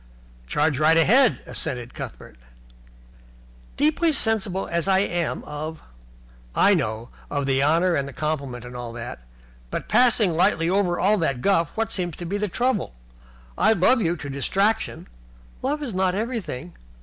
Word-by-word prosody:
"Charge 145 - +1
right 160 +2 +5
ahead," 235 - +4
assented 125 -6 -5
Cuthbert. 60 - -9 1.4
"Deeply 315 +3 +2
sensible 220 -8 0
as 170 0 -1
I 190 -1 +4
am 175 -4 -1
of 155 +2 -6 0.4
" - - -26
"I 205 - +5
know. 115 - -2 0.2
Of 145 -1 -1
the 135 0 +1
honour 165 +5 +3
and 140 -3 0
the - - -7
compliment 140 -5 -3
and 125 0 -9
all 120 -1 -6
that. 120 - -7 0.5
But, - - -4
passing 220 -5 +4
lightly 170 -1 +2
over 185 -3 +1
all 205 +2 +3
that 135 -7 -1
guff, 170 -6 +2
what 225 0 -1
seems 175 -6 -2
to 175 - -7
be 200 +4 -2
the 210 - 0
trouble? 225 - -1 0.6
I 220 - +4
love 225 +6 +3
you 170 -3 +1
to 145 - -7
distraction 195 +11 0 0.3
" - - -26
"Love 295 +3 -1
is 245 -7 -4
not 185 0 +1
everything." 185 - -4
170 Hz, 160 wpm, -24 LUFS, 140-205 Hz, 1.4 s, right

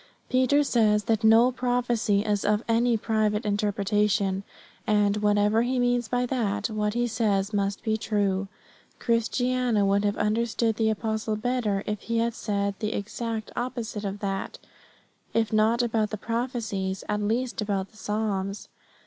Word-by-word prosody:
Peter 260 +3 +4
says 215 -6 +2
that 225 +1 0
no 225 +3 +6
prophecy 245 -4 +1
is 205 -1 0
of 210 +2 +1
any 230 0 +3
private 215 0 0
interpretation; 205 -1 +1 0.5
and, 210 -1 +3
whatever 210 +1 +3
he 250 +2 0
means 245 -1 +1
by 245 +1 0
that, 215 -5 -1
what 210 0 -1
he 240 0 +1
says 215 -3 0
must 200 0 -1
be 220 -1 +1
true. 200 -3 0 0.5
But - - -36
Christiana 240 -1 +1
would 200 +1 +2
have 205 0 0
understood 225 +1 0
the 220 -1 +2
apostle 220 0 -1
better 215 -3 -1
if 210 -1 -3
he 230 0 -2
had 230 +1 +1
said 200 -2 -1
the 215 0 -2
exact 220 +2 -4
opposite 235 -4 -4
of 200 0 -4
that, 195 -1 -3 0.8
if 225 -2 +1
not 220 +3 +3
about 225 -2 0
the 215 - -4
prophecies, 220 -5 -3
at 210 0 -1
least 235 +3 -1
about 200 -2 -2
the 215 - -20
psalms. 210 -2 -3
215 Hz, 155 wpm, -26 LUFS, 205-235 Hz, 0.8 s, no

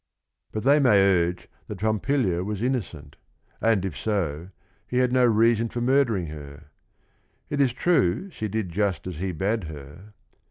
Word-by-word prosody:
But 110 - -4
they 140 +3 +5
may 125 -7 +5
urge 90 -3 +2 0.2
that 105 - -7
Pompilia 110 -4 0
was 105 +2 -4
innocent, 85 - -3 0.4
and 110 -4 +2
if 95 - -4
so, 90 -6 -2 0.4
he 125 - -2
had 125 -1 +2
no 130 -1 +4
reason 115 0 +3
for 120 - -4
murdering 120 -7 +2
her. 75 -1 -10 0.8
It 145 -1 +1
is 135 -3 +3
true 160 - +1
she 110 - -4
did 105 -2 -3
just 95 -2 -1
as 90 -4 -6
he 95 +3 -2
bade 100 +4 -1
her 80 +7 -11
105 Hz, 160 wpm, -25 LUFS, 85-120 Hz, 0.8 s, they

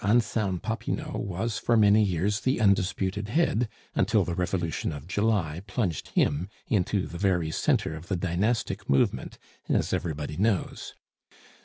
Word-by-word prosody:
Anselme 105 -3 +2
Popinot 110 +5 -3
was 105 +3 -2
for 115 - +2
many 105 0 +6
years 100 +1 +1
the 130 +2 0
undisputed 100 0 +1
head, 120 -5 +2 0.2
until - - +3
the 85 - -2
Revolution 85 -2 -1
of 75 -2 -7
July 95 -6 0
plunged 95 - -2
him 80 +7 +2 0.2
into 100 -1 +1
the 85 - -7
very 85 -5 +1
centre 80 - +1
of 80 +3 -10
the 100 - 0
dynastic 95 +6 -1
movement, 70 - +1 0.3
as - - +1
everybody 75 -2 -3
knows. 100 -2 -1
95 Hz, 140 wpm, -27 LUFS, 85-105 Hz, 0.3 s, many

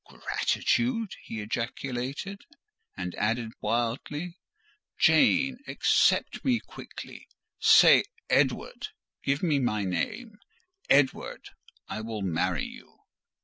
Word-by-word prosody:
"Gratitude!" 235 -3 0
he 110 - -6
ejaculated; 130 - -4 0.6
and 90 -1 -4
added 115 +2 0
wildly—"Jane 245 - 0
accept - - +2
me 250 -3 +2
quickly. - - -11 0.3
Say, - - +7 0.2
Edward—give 425 - -1
me 155 -5 +2
my 110 -5 0
name—Edward—I 210 - -3
will 110 -2 -5
marry 90 0 0
you." - - -12
140 Hz, 75 wpm, -28 LUFS, -, 0.6 s, Say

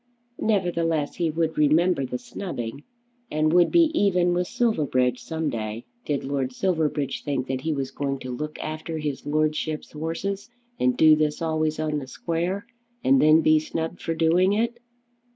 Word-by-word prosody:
Nevertheless 170 -7 0
he 170 -2 +1
would 160 0 -1
remember 150 -1 +3
the 125 - -3
snubbing 125 - -6 0.5
and 155 +1 +1
would 175 -1 +5
be 335 -2 +5
even 180 - +3
with 180 0 0
Silverbridge 130 - +1
some 160 -1 -2
day. 110 0 -4 0.2
Did 145 -2 -1
Lord 135 -2 -2
Silverbridge 155 -5 -1
think 135 -3 -1
that 130 -1 -3
he 160 - -1
was 135 -3 -2
going 140 -1 -2
to 125 -1 -5
look 150 +4 -5
after 155 +1 -5
his 150 -3 -4
Lordship's 155 +1 -1
'orses, 175 +7 -4 0.3
and 125 0 +2
do 155 -1 +7
this 150 -1 0
always 155 -1 0
on 155 -1 -1
the 135 - -8
square, 170 - -2 0.4
and 270 0 +5
then 155 +1 +6
be 155 0 +5
snubbed 160 +2 -4
for 165 - -2
doing 175 +4 +3
it! 235 +3 0
155 Hz, 165 wpm, -25 LUFS, 145-175 Hz, 0.5 s, do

